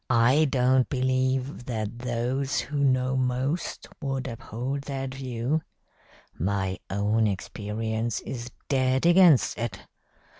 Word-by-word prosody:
I 130 +5 +5
don't 130 -2 +3
believe 130 0 0
that 110 -1 -4
those 125 +3 -1
who 145 0 -3
know 130 -1 +2
most 130 +5 -1
would 135 -2 -2
uphold 130 +3 -4
that 135 -2 -4
view. 130 +3 -1 0.8
My 95 +1 -1
own 105 +3 +2
experience 110 +3 -2
is 120 -1 -6 0.2
dead 130 +1 +2
against 170 - +6
it. 115 -2 -3
130 Hz, 110 wpm, -27 LUFS, 115-135 Hz, 0.8 s, against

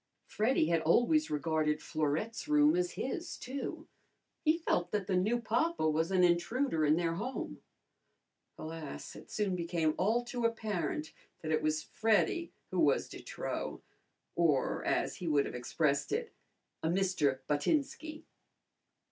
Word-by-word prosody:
Freddy 215 -7 +1
had 165 -1 +2
always 245 - +3
regarded 150 0 0
Florette's 155 - -2
room 300 +1 +5
as 360 0 0
his, 350 -4 -4
too. 270 +2 -5 0.6
He 310 +1 +4
felt 180 - 0
that 205 0 -1
the 190 -1 0
new 215 +7 +2
papa 235 - +1
was 160 +2 +1
an 185 -1 +3
intruder 175 - +2
in 150 0 +5
their 165 -1 0
home. 240 +10 -4 1.0
Alas! 160 -2 -7
It - - -12
soon 205 -3 0
became 170 -2 0
all 220 +6 +2
too 245 0 -4
apparent 205 -10 -1 0.3
that 160 - -3
it 155 0 +2
was 155 0 0
Freddy 220 - +1 0.2
who - - -1
was - - +3
de - - -9
trop, - - -4 0.5
or, 155 -6 +2
as - - 0
he 175 - -5
would 145 -3 +3
have - - -5
expressed 140 +3 0
it, 460 +1 -2 0.5
a 160 - 0
Mister 170 -8 +1
Buttinski. 305 - -1
180 Hz, 145 wpm, -33 LUFS, 155-240 Hz, 1.0 s, room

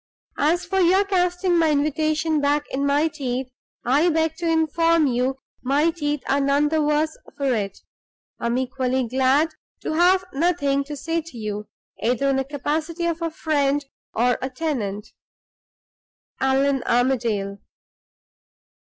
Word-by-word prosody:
"As 330 +5 +2
for 385 +2 0
your 375 +3 +4
casting 360 -2 +1
my 325 -1 +3
invitation 310 +1 +1
back 290 +1 +1
in 280 +1 0
my 290 +3 +3
teeth, 260 -4 -4 0.3
I 290 +8 +3
beg 320 -1 +1
to 340 - -2
inform 325 0 +3
you 255 +1 0 0.3
my 285 +5 +2
teeth 295 -3 -2
are 280 +1 +2
none 280 +2 +2
the 315 0 +1
worse 300 +1 +1 0.2
for 275 -2 +1
it. 200 -4 -2 0.6
I - - -2
am 235 +1 0
equally 260 -1 -1
glad 265 +6 +2 0.3
to - - -3
have 365 +3 +4
nothing 285 -3 +1
to 295 0 -6
say 330 +4 -1
to 320 -6 -12
you, 210 -1 -4 0.3
either 250 +4 +1
in 270 - +2
the 270 - +1
capacity 310 +5 -3
of 335 0 -1
a 335 - 0
friend 290 -3 0 0.3
or 245 +2 +2
a 260 - -2
tenant. 245 -8 -3 1.3
ALLAN 270 0 +2
ARMADALE." 230 -5 0
290 Hz, 145 wpm, -23 LUFS, 260-320 Hz, 1.3 s, your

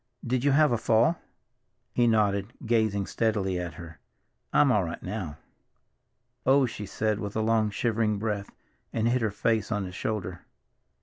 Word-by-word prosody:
Did 125 +1 0
you 145 - +4
have 150 0 +5
a 120 - +1
fall?" 115 +9 +3 0.7
He 120 -1 +3
nodded, 105 -1 +1
gazing 110 -4 +1
steadily 100 -5 0
at 90 -1 -5
her. 80 -2 -10 0.5
"I'm 145 -3 +5
all 105 -5 +3
right 85 0 -6
now." 95 -7 -5 1.1
"Oh," 135 +1 +5
she 105 -4 -6
said 110 +1 -1
with 100 -2 -5
a 110 - +1
long, 110 -1 +2
shivering 110 0 0
breath, 105 -1 -3 0.4
and 115 0 0
hid 125 +1 +2
her 110 - +1
face 110 +1 0
on 105 -2 -1
his 90 - -8
shoulder. 95 -4 -3
110 Hz, 165 wpm, -27 LUFS, 100-115 Hz, 1.1 s, have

